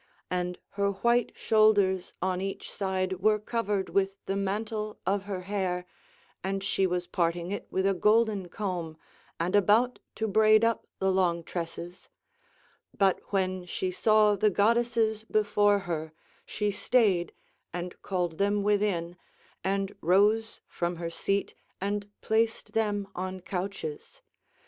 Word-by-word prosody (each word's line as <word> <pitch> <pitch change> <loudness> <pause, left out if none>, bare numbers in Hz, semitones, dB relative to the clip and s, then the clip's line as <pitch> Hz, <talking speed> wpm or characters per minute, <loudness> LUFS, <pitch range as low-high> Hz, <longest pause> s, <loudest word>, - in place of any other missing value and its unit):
And 180 0 -1
her 200 0 0
white 235 +4 +2
shoulders 205 -4 +3
on 185 -1 0
each 195 0 -5
side 190 -2 -1
were 215 +2 +4
covered 210 -2 -2
with 195 0 +1
the 195 - -1
mantle 210 +2 -2
of 200 0 0
her 195 -3 -4
hair 185 -2 -2 0.6
and 195 +1 -2
she 195 -1 +1
was 180 0 -1
parting 170 0 -1
it 205 - -4
with 190 0 0
a 195 - +3
golden 210 -1 +2
comb 175 -5 -4 0.4
and 175 +4 0
about 215 +5 +4 0.2
to 220 - -1
braid 215 +1 +5
up 230 -1 0
the 190 0 +1
long 175 -3 +1
tresses; 170 +1 -6 0.9
but 195 -2 +3
when 185 -2 0
she 185 +1 -2
saw 215 +2 +4
the 215 +2 +3
goddesses 225 +1 +2
before 205 -1 +3
her, 160 -2 -3 0.3
she 210 -1 -1
stayed 200 -6 +2 0.4
and 175 +1 -6
called 175 -4 -2
them 205 0 +2
within, 200 -4 0 0.5
and 195 +1 -1
rose 210 +5 +3
from 175 0 -2
her 170 0 -4
seat 195 +3 -1 0.3
and 205 +1 -2
placed 225 +1 0
them 205 -3 0
on 185 +1 -4
couches. 180 -4 -5
195 Hz, 135 wpm, -28 LUFS, 180-210 Hz, 0.9 s, braid